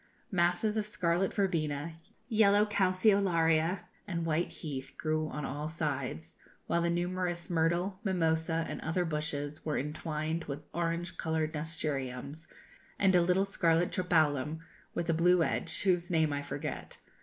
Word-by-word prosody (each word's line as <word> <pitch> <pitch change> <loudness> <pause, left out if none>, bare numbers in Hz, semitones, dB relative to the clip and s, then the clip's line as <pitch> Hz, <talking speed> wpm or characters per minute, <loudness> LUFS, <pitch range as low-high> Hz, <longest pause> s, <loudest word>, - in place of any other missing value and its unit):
Masses 180 +4 +2
of 210 -1 0
scarlet 180 -2 +1
verbena, 165 -6 -1 0.3
yellow 210 -3 +5
calceolaria, 185 -4 +3 0.3
and 170 -4 -2
white 165 +1 +1
heath, 135 -4 -6
grew 155 0 0
on 150 -1 -4
all 150 +3 -3
sides, 140 - -3 0.3
while 170 - +1
the 170 - +1
numerous 175 0 -1
myrtle, 175 +3 +1
mimosa, 165 -4 +1
and - - -5
other 175 +3 0
bushes, 150 -2 -3
were 150 -2 -1
entwined 155 +2 -2
with 145 +1 -5
orange 170 +1 -2
coloured 160 -1 -1
nasturtiums, 150 -2 -3 0.5
and 190 -2 +4
a 175 - +6
little 180 +3 +3
scarlet 170 -3 +2
tropæolum, 155 -4 +1 0.3
with 170 - -1
a 165 - +3
blue 175 +1 +4
edge, - - -1
whose 180 -3 +2
name 160 -4 +2
I 145 - -1
forget. - - -5
165 Hz, 140 wpm, -31 LUFS, 155-180 Hz, 0.5 s, a